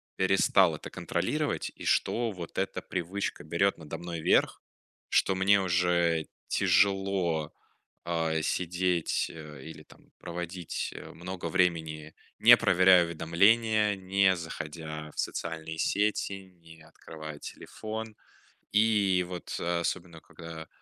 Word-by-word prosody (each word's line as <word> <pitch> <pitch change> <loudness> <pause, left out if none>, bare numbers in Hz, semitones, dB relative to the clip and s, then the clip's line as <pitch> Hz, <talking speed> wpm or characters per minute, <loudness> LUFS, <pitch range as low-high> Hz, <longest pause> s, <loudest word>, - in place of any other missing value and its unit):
перестал 95 +1 +3
это - - -9
контролировать, - - -2
и - - -9
что 115 -1 +1
вот 90 -3 -9
эта - - -2
привычка 90 +3 -4
берёт 85 +5 +1
надо 80 0 -7
мной 85 -2 -5
верх, - - +2 0.5
что 95 - +2
мне 100 +1 +4
уже 85 -3 +2 0.2
тяжело, 95 -5 +1 0.5
а, 80 -2 0
сидеть, 90 +1 0
э, 75 -3 -10
или, 80 0 -10
там, - - -20
проводить, 85 0 -5
э, - - -9
много 90 0 -6
времени, 80 -3 0 0.2
не - - +9
проверяя 90 -1 +5
уведомления, 105 +6 +3
не 95 0 +2
заходя 80 -2 -7
в - - -9
социальные 80 -1 -4
сети, 100 0 0
не 80 -1 -15
открывая 80 -1 -10
телефон. 110 0 -7 0.6
И, 105 -4 +3
вот, 90 -1 -6
особенно 85 -1 -2
когда 80 -2 -10
85 Hz, 115 wpm, -29 LUFS, 80-95 Hz, 0.6 s, не